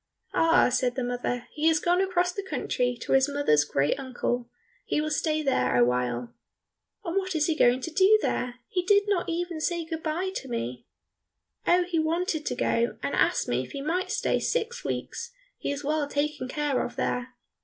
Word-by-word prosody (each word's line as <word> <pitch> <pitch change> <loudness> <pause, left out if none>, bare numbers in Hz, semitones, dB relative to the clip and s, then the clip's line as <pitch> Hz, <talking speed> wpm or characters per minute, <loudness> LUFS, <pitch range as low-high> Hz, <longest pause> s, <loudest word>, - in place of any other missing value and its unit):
"Ah," 330 -3 +4
said 250 -1 +1
the 260 - -1
mother, 245 0 -2
"he 310 +1 +1
has 320 -1 +4
gone 355 +3 +2
across 360 -2 +1
the 400 - -4
country 250 -10 -1
to - - -5
his 270 +1 +4
mother's 280 - +3
great 145 - 0
uncle; 245 -2 -2 0.3
he - - -1
will 310 0 -1
stay 310 0 0
there 125 - +1
awhile." 125 0 +1 0.7
"And 340 +2 -1
what 375 -2 -1
is 305 -1 +2
he 325 - +1
going 250 -3 +4
to 330 - -4
do 390 +5 +6
there? 250 - -1
He 360 - 0
did 405 +2 +4
not 385 -5 0
even 340 -1 -2
say 340 +1 -1
good 320 0 -5
bye 340 +5 -2
to 270 - -7
me." 125 - -4 0.8
"Oh, 355 +1 +5
he 350 -2 -1
wanted 320 0 -1
to - - -1
go, 235 +1 0
and - - -2
asked - - +2
me - - +1
if - - -9
he 280 - -4
might 350 +5 -1
stay - - +1
six 480 +1 -1
weeks, 475 +1 -4 0.3
he - - -2
is 285 +1 -4
well 300 0 0
taken 285 -2 -2
care 290 0 0
of 245 - -6
there." 250 -1 -2
300 Hz, 195 wpm, -27 LUFS, 250-350 Hz, 0.8 s, do